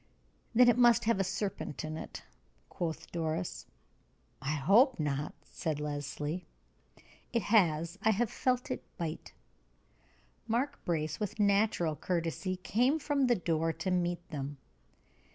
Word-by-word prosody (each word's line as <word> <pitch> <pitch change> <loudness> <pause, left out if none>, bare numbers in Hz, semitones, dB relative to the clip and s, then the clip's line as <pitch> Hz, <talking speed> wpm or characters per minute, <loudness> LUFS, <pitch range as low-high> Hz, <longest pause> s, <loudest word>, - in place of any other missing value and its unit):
"Then 250 +1 +7
it 240 0 +5
must 240 -1 +6
have 230 -3 +2
a - - +3
serpent 190 -5 -3
in 155 0 -4
it," - - -7 0.5
quoth 165 -4 -4
Doris. 165 +1 -3 0.7
"I 140 +3 -1
hope 215 - +5
not," 145 -1 -2
said 155 -2 -3
Leslie. 150 +3 -3 0.8
"It 235 -2 +1
has. 170 -4 +2
I 220 - +3
have 220 +2 +1
felt 250 0 0
it - - -2 0.2
bite!" 165 -3 -4 1.2
Mark 255 +6 -1
Brace, 155 -3 -1
with 210 0 -3
natural 200 -5 +3
courtesy, 170 +3 -2
came 245 +10 +2
from 285 -3 +1
the 240 - +4
door 165 -3 0
to 185 - -3
meet 175 -1 0
them. 140 -1 -4
180 Hz, 135 wpm, -32 LUFS, 155-225 Hz, 1.2 s, Then